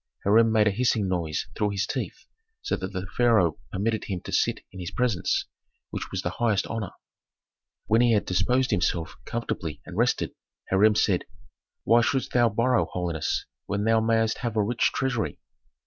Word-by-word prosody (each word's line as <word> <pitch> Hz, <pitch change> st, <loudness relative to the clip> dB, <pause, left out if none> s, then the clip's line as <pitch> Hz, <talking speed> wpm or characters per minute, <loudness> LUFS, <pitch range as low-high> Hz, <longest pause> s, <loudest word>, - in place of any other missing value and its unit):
Hiram 110 Hz, +3 st, +5 dB
made 110 Hz, -1 st, +4 dB
a -, -, +4 dB
hissing 110 Hz, -1 st, +1 dB
noise 85 Hz, -4 st, -1 dB
through 105 Hz, -, +1 dB
his 100 Hz, -1 st, -1 dB
teeth, -, -, -5 dB, 0.4 s
so -, -, 0 dB
that 95 Hz, -, -5 dB
the 95 Hz, -1 st, -4 dB
pharaoh 110 Hz, -10 st, +3 dB
permitted 110 Hz, +3 st, -1 dB
him 95 Hz, -3 st, -3 dB
to -, -, -8 dB
sit -, -, +1 dB
in 95 Hz, -, -10 dB
his 90 Hz, -2 st, -4 dB
presence, 120 Hz, -8 st, 0 dB, 0.5 s
which -, -, -5 dB
was -, -, -3 dB
the -, -, -1 dB
highest 110 Hz, -5 st, +2 dB
honor. 115 Hz, -4 st, -4 dB, 1.0 s
When 110 Hz, +2 st, +3 dB
he 120 Hz, -1 st, +4 dB
had 105 Hz, -, +2 dB
disposed 125 Hz, +8 st, +1 dB
himself 85 Hz, -1 st, 0 dB
comfortably 85 Hz, -10 st, -4 dB
and 85 Hz, -, -9 dB
rested, 120 Hz, +5 st, +1 dB, 0.4 s
Hiram 105 Hz, +3 st, +5 dB
said, 95 Hz, -4 st, +2 dB, 0.6 s
"Why 120 Hz, +1 st, +5 dB
shouldst 130 Hz, +2 st, 0 dB
thou 120 Hz, -1 st, +4 dB
borrow, 115 Hz, +3 st, +2 dB
holiness, 85 Hz, -3 st, -2 dB, 0.2 s
when 100 Hz, +1 st, -1 dB
thou 110 Hz, +1 st, +4 dB
mayst 115 Hz, 0 st, +1 dB
have 115 Hz, -3 st, -3 dB
a 105 Hz, -, +4 dB
rich 115 Hz, +3 st, +1 dB
treasury?" 125 Hz, -6 st, -1 dB
110 Hz, 175 wpm, -26 LUFS, 95-115 Hz, 1.0 s, Hiram